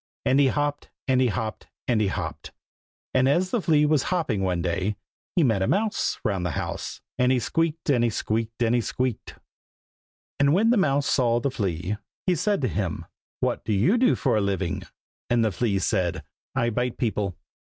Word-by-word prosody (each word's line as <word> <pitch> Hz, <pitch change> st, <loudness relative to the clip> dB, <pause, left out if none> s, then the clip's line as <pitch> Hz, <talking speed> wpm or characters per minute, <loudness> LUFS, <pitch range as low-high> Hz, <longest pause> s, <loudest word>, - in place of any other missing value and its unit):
And 135 Hz, -, +4 dB
he 140 Hz, -, +5 dB
hopped, 145 Hz, +1 st, -1 dB, 0.2 s
And 130 Hz, -1 st, +3 dB
he 130 Hz, -, +4 dB
hopped, 110 Hz, +1 st, -3 dB, 0.2 s
And 115 Hz, -3 st, +2 dB
he 105 Hz, -, +2 dB
hopped. 95 Hz, -, -4 dB, 0.6 s
And 130 Hz, +1 st, +4 dB
as 180 Hz, +6 st, +2 dB
the 240 Hz, -, +1 dB
flea 150 Hz, -4 st, +3 dB
was 150 Hz, -2 st, +3 dB
hopping 155 Hz, -, 0 dB
one 90 Hz, -3 st, 0 dB
day, 95 Hz, +4 st, -1 dB, 0.4 s
He 175 Hz, -, +4 dB
met 110 Hz, -8 st, +2 dB
a 95 Hz, -, +1 dB
mouse, 210 Hz, +1 st, 0 dB
Round 95 Hz, -3 st, 0 dB
the 90 Hz, -, 0 dB
house, -, -, -4 dB, 0.2 s
And 125 Hz, 0 st, +4 dB
he 130 Hz, -, +3 dB
squeaked, 165 Hz, +5 st, -1 dB
And 120 Hz, -3 st, +3 dB
he 120 Hz, -, +3 dB
squeaked, 115 Hz, +2 st, -2 dB
And 115 Hz, 0 st, +2 dB
he 120 Hz, -, +3 dB
squeaked. 125 Hz, +1 st, -3 dB, 1.0 s
And 140 Hz, 0 st, +4 dB
when 225 Hz, +5 st, +4 dB
the -, -, +4 dB
mouse 140 Hz, -6 st, +2 dB
saw 120 Hz, -4 st, +2 dB
the 135 Hz, +2 st, -1 dB
flea, 95 Hz, -4 st, -2 dB, 0.3 s
he 185 Hz, -, +3 dB
said 200 Hz, +3 st, 0 dB
to 130 Hz, -, +1 dB
him, 100 Hz, -7 st, -2 dB, 0.4 s
"what -, -, 0 dB
do 110 Hz, -, -1 dB
you 115 Hz, -, +3 dB
do 250 Hz, +1 st, +4 dB
for 135 Hz, -5 st, +1 dB
a 105 Hz, -, +2 dB
living?" 95 Hz, -3 st, -1 dB, 0.5 s
and 120 Hz, -1 st, +3 dB
the 110 Hz, -, +1 dB
flea 100 Hz, +1 st, 0 dB
said 95 Hz, -3 st, 0 dB, 0.3 s
"I 120 Hz, -3 st, +1 dB
bite 125 Hz, +2 st, -1 dB
people." 105 Hz, -, -1 dB
120 Hz, 195 wpm, -25 LUFS, 105-145 Hz, 1.0 s, he